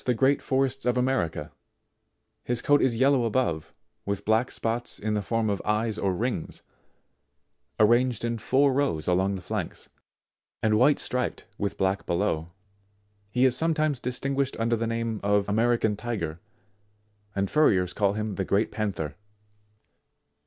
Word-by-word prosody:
the 125 - +3
great 135 +4 +3
forests 135 0 0
of 125 0 +2
America; 85 - -1 0.9
his 120 -1 -1
coat 145 0 +4
is 125 -3 +2
yellow 135 0 +4
above, 110 -9 -1 0.3
with 100 0 -3
black 110 +3 +2
spots 115 +1 -2
in 110 0 -2
the 105 - 0
form 115 +2 -1
of 100 -2 -1
eyes 110 +1 0
or 95 - +1
rings, 110 -1 -3 1.2
arranged 120 +2 +3
in 115 -1 -2
four 135 +4 +3
rows 130 - 0
along 95 +2 +2
the 90 - -7
flanks, - - -4 0.7
and 110 -1 +3
white 145 +4 +5
striped 125 0 -2
with 100 -1 -2
black 95 +1 0
below. 85 -3 0 0.8
He 125 +5 +2
is 130 -1 +4
sometimes 155 -2 +1
distinguished 135 +2 -2
under 115 +1 +2
the 115 0 -2
name 115 -1 -2
of 100 0 +2
American 110 0 +2
Tiger, 100 -8 -4 1.0
and 100 0 0
furriers 95 - +3
call 100 -1 +1
him 105 0 -3
the 95 - 0
Great 100 +4 +1
Panther. 100 -9 -3
115 Hz, 145 wpm, -26 LUFS, 100-125 Hz, 1.2 s, white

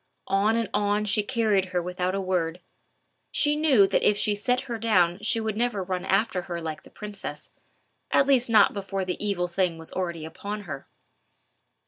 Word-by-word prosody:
On 205 +3 +3
and 230 -2 0
on 205 0 +1
she 210 +1 +3
carried 210 -4 +1
her 185 -1 -1
without 180 +1 -2
a - - -1
word. 180 -3 -1 0.7
She 295 0 +2
knew 290 -9 +5
that - - +1
if 205 - +3
she 210 - +2
set 250 +5 0
her 240 -4 -5
down 180 -5 +2
she 215 +2 +1
would 220 -2 -2
never 230 -3 0
run 185 -1 -3
after 195 -1 +1
her 170 -1 -3
like 160 -2 -5
the - - -16
princess, 200 -8 -8 0.6
at 275 - +4
least 260 -3 +3
not 215 -3 +5
before 195 -1 -3
the 180 +2 -3
evil 195 -4 0
thing 175 -1 0
was 160 0 -8
already 170 -4 -3
upon 205 +6 -6
her. 140 -8 -8
200 Hz, 185 wpm, -26 LUFS, 180-220 Hz, 0.7 s, knew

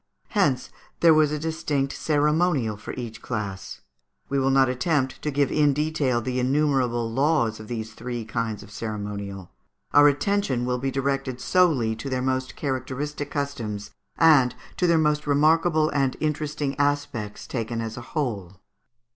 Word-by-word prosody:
Hence 145 - +1 0.3
there 165 -1 +7
was 155 -1 +4
a 150 - -1
distinct 150 -3 -1
ceremonial 150 -5 +1
for 105 - -8
each 120 -3 -7
class. 105 -5 -5 0.5
We 140 - +1
will 135 0 +2
not 135 0 +4
attempt 130 +1 0
to 150 - -1
give 140 -1 +1
in 145 -2 +3
detail 145 -4 0
the 125 +2 -1
innumerable 130 -3 +1
laws 130 -5 +1
of 110 - -9
these 110 -2 -5
three 120 0 -5
kinds 110 -1 -3
of 105 - -15
ceremonial; 100 -3 -5 0.4
our 145 0 +8
attention 145 -4 +1
will 125 0 -1
be 135 +2 -1
directed 135 -1 -2
solely 145 -13 +2
to 135 +5 -5
their 130 -1 -1
most 130 0 -1
characteristic 140 +2 -3
customs, 115 -8 -4 0.3
and 145 -6 +5 0.2
to 180 - +2
their 170 -1 +4
most 150 -1 +1
remarkable 155 +2 +3
and 135 -2 0
interesting 150 -2 -2
aspects 145 -7 -1
taken 115 -2 -3
as 115 -1 -4
a - - -7
whole. 105 - -4
135 Hz, 155 wpm, -25 LUFS, 115-150 Hz, 0.5 s, our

